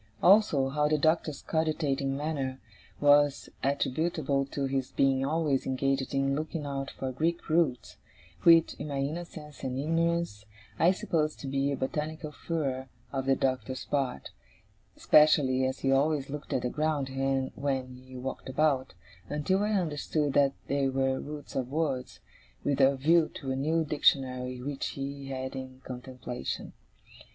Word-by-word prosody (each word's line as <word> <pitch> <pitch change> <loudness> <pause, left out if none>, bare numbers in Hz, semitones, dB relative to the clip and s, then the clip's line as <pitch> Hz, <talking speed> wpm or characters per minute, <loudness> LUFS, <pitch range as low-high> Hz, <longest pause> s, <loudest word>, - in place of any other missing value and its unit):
Also, 180 -9 +5
how 150 +2 +1
the 155 0 +2
Doctor's 155 0 +1
cogitating 150 -4 0
manner 140 -3 -2 0.4
was 145 -1 +4
attributable 140 0 0
to 140 0 -2
his 135 -1 -1
being 135 -1 +2
always 150 -2 0
engaged 135 +1 0
in 135 0 +1
looking 155 0 -3
out 135 -1 -3
for 130 -1 -4
Greek 165 +6 -1
roots; 155 -6 +1 0.4
which, 165 -1 +6
in - - -4
my 140 -2 -3
innocence 150 +1 -5
and 130 0 -2
ignorance, 165 -6 0 0.4
I 170 - +6
supposed 160 -4 0
to 140 - -5
be 135 +1 0
a 140 - -2
botanical 155 +3 -3
furor 140 -5 -3 0.3
on 135 -1 -2
the 135 - +4
Doctor's 130 -1 -2
part, 135 - -2 0.7
especially 135 -4 +5
as 130 - -4
he 135 - +2
always 140 0 +2
looked 150 0 -6
at 125 - 0
the 125 - 0
ground 150 -3 0 0.4
when 130 -2 -2
he 130 0 -11
walked 130 +1 -5
about, 135 -4 +1 0.3
until 150 +7 +1
I 210 +1 +1
understood 150 -5 0
that 140 -1 +4
they 140 -1 +1
were 135 0 0
roots 145 0 -8
of 130 -2 -1
words, 140 -4 -2 0.4
with 140 -1 +1
a 135 +1 +5
view 160 +4 +3
to 135 -2 -4
a - - 0
new 160 +4 +1
Dictionary 130 -4 +1
which 140 0 -3
he 140 0 -5
had 130 0 -4
in 130 0 -8
contemplation. 125 -1 -6
140 Hz, 150 wpm, -29 LUFS, 130-155 Hz, 0.7 s, which